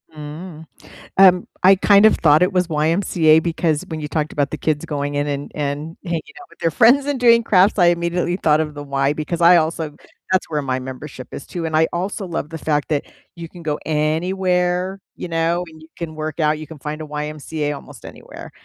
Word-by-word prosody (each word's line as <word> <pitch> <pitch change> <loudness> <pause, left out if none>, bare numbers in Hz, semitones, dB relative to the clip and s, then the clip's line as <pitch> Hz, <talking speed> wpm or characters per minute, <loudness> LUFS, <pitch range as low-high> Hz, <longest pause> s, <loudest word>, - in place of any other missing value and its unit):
Mm. 155 +2 -9 0.5
Um, 185 -2 +6 0.2
I 190 +1 +7
kind 200 +2 +5
of 220 - +4
thought 150 0 +4
it 185 +2 +2
was 180 -1 +1
YMCA 160 0 +3
because 165 -2 -1
when 160 -1 -5
you 150 - -5
talked 155 -1 -2
about 145 -2 -1
the - - -4
kids 150 -1 -1
going 145 -1 -3
in 145 0 0
and 145 -1 -4
and 150 +2 -4
hanging 170 -3 -2 0.2
out 365 - -14
with - - -22
their 165 - +1
friends 245 - +5
and 285 -3 -2
doing 235 -1 +6
crafts, 200 -1 +3
I 175 - +5
immediately 175 +1 0
thought 155 -4 +2
of 150 -1 -3
the 145 - -7
Y 140 0 0
because 155 +3 -4
I 175 +1 +8
also 160 -2 -1 0.4
that's 185 - +1
where 150 -2 -1
my 130 -1 -2
membership 130 +1 -8
is - - -8
too, 175 -2 -5
and 160 -1 -1
I 160 +1 +4
also 190 +3 -3
love 165 -4 -4
the 160 - -6
fact 150 -1 -1
that 150 -2 -1 0.3
you 165 -1 -8
can 175 0 -13
go 150 -2 -2
anywhere, 180 +4 0 0.2
you - - -7
know? 165 +1 0
You 160 0 -15
can 160 -2 -6
work 155 +1 -4
out, 155 0 +2
you 155 - -8
can 160 0 -11
find 150 +2 -5
a - - -5
YMCA 150 0 -4
almost 140 -3 -11
anywhere, - - -11
160 Hz, 215 wpm, -20 LUFS, 150-180 Hz, 0.5 s, I